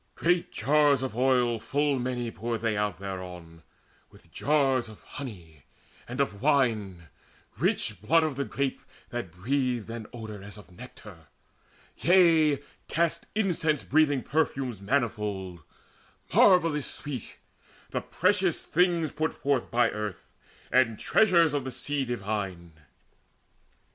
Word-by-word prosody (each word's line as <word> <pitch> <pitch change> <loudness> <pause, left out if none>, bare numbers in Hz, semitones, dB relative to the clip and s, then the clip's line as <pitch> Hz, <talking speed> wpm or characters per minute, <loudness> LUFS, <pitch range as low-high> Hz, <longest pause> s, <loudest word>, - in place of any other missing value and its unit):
Great 175 +1 +1
jars 145 +1 +3
of 130 -4 -4
oil 125 -2 +2
Full 145 +1 0
many 120 -2 -2
poured 115 +2 -4
they 115 -2 0
out 105 -2 -1
thereon, 90 -4 -8 0.5
with - - -20
jars 135 -5 +1
Of 110 - -13
honey 85 - -9 0.4
and 125 +2 -6
of 105 -8 -1
wine, 110 - +1 0.5
rich - - 0
blood 165 +10 +4
of 155 -3 -1
the 140 - -1
grape 135 +3 -2 0.3
That 120 -6 -4
breathed 120 +4 -1
an 115 -2 -6
odour 110 -4 -8
as 100 +1 -10
of 105 -2 -14
nectar, 100 - -13 0.7
yea, 165 -5 +4 0.2
Cast 170 +1 0
incense 165 -8 +1
breathing 145 -3 +2
perfumes 135 -8 -1
manifold 100 -6 -2 0.7
Marvellous 165 -6 +4
sweet, 135 -6 -6 0.5
the - - -1
precious 185 -2 +1
things 170 -2 +2
put 155 +1 -2
forth 140 -3 0
By 120 -1 +2
earth, 105 -3 -5 0.5
and 125 -4 +3
treasures 170 - +4
of 145 -2 -1
the 130 - -4
sea 140 +1 -2
divine. 100 -7 -4
125 Hz, 125 wpm, -28 LUFS, 105-150 Hz, 0.7 s, blood